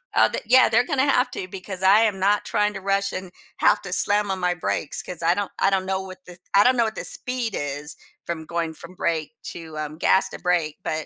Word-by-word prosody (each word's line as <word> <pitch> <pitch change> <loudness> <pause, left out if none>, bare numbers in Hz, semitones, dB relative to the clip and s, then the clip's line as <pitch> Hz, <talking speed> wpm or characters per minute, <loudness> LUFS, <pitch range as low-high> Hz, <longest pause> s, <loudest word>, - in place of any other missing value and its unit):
uh, - - +5
the - - -2
yeah, 255 -2 +6
they're 235 +2 +3
gonna 280 0 +2
have 250 - +1
to 185 - -4
because 190 0 -7
I 200 +4 +6
am 190 -2 -8
not 205 +2 +2
trying 210 0 +1
to 195 - -6
rush 200 0 0
and 185 -1 -6 0.3
have - - +3
to - - -5
slam 205 -1 +1
on 190 - -2
my 180 0 +1
brakes 160 -3 -3
'cause 175 -2 -7
I 170 +1 +4
don't 205 -1 -3
I 195 - +4
don't 190 -1 +1
know 190 0 0
what 185 -1 -9
this 175 0 -12 0.2
I 200 - +7
don't 255 0 +4
know 235 - +4
what 220 - -17
the - - -5
speed 250 -4 -2
is 145 +1 -4 0.3
from 160 -2 -4
going 170 -1 -2
from 170 +3 -11
brake 160 0 -1 0.2
to, 160 -2 -9
um, 155 0 -5
gas 190 - +3
to - - -8
brake, 170 -4 0
but 155 0 -2
185 Hz, 250 wpm, -23 LUFS, 170-205 Hz, 0.3 s, I